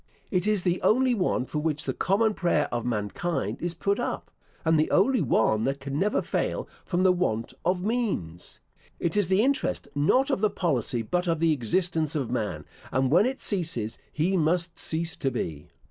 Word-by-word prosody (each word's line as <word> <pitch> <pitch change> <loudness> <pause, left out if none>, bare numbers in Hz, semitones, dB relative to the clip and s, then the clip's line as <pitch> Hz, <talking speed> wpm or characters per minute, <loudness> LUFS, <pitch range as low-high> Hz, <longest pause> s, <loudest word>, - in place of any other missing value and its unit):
It 185 -1 +1
is 210 -4 +3
the 180 -1 0
only 255 +3 +3
one 180 - 0
for 150 - -3
which 150 0 -1
the - - -2
common 215 +4 +2
prayer 175 -3 +1
of 120 0 -2
mankind 115 - -2
is 175 0 -2
put 200 +5 0
up, 240 - -3 0.3
and 160 -1 +4
the 155 - +2
only 235 +5 +3
one 110 -5 +2
that 135 +1 -1
can 140 +1 -4
never 210 +3 +1
fail - - -2 0.2
from 180 0 0
the 185 - +6
want 115 -12 -1
of 180 +1 0
means. 200 - -3 0.4
It 170 - -1
is 205 -4 +3
the 190 +4 +3
interest, 275 +2 0
not 255 - +2
of 235 - 0
the 215 - +3
policy, 130 - -1
but 180 +11 -1
of 165 -2 +1
the 165 -1 +3
existence 160 - 0
of 135 -6 -2
man, 100 -11 -2 0.3
and 130 0 +1
when 175 +9 +5
it 265 +1 -3
ceases, 160 - -2
he 175 +5 0
must 170 +1 +1
cease 165 +1 -1
to 135 - 0
be. 80 - -4
165 Hz, 190 wpm, -27 LUFS, 135-190 Hz, 0.4 s, the